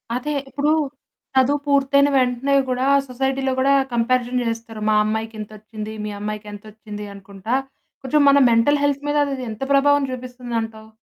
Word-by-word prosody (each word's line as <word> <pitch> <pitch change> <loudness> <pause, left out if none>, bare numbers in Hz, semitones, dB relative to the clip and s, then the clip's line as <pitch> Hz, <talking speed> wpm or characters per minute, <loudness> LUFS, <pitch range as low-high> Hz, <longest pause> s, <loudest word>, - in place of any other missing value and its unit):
అదే 295 +4 -2 0.2
ఇప్పుడు, 290 +2 0 0.6
చదువు 270 +3 +3
పూర్తైన 280 0 +3
వెంటనే 255 +1 +1 0.2
గూడా 255 +2 0 0.2
సొసైటీలో 265 +1 -1
గూడా 275 +1 +3 0.2
కంపారిషన్ 245 +1 +1
చేస్తారు. 225 -1 -5
"మా 215 - +3
అమ్మాయికింతొచ్చింది, 215 0 -5
మీ 210 - -4
అమ్మాయికెంతొచ్చింది?" 210 0 -7
అనుకుంటా. 200 +4 -5 0.5
కొంచెం 295 +3 +2
మన 280 - +6
మెంటల్ 285 +6 +3
హెల్త్ 285 0 0
మీద 295 - +1 0.2
అది 255 -1 -6
ఎంత 215 - -10
ప్రభావం 285 +1 +4
చూపిస్తుందంటావు? 240 -3 -5
245 Hz, 130 wpm, -21 LUFS, 220-275 Hz, 0.6 s, మన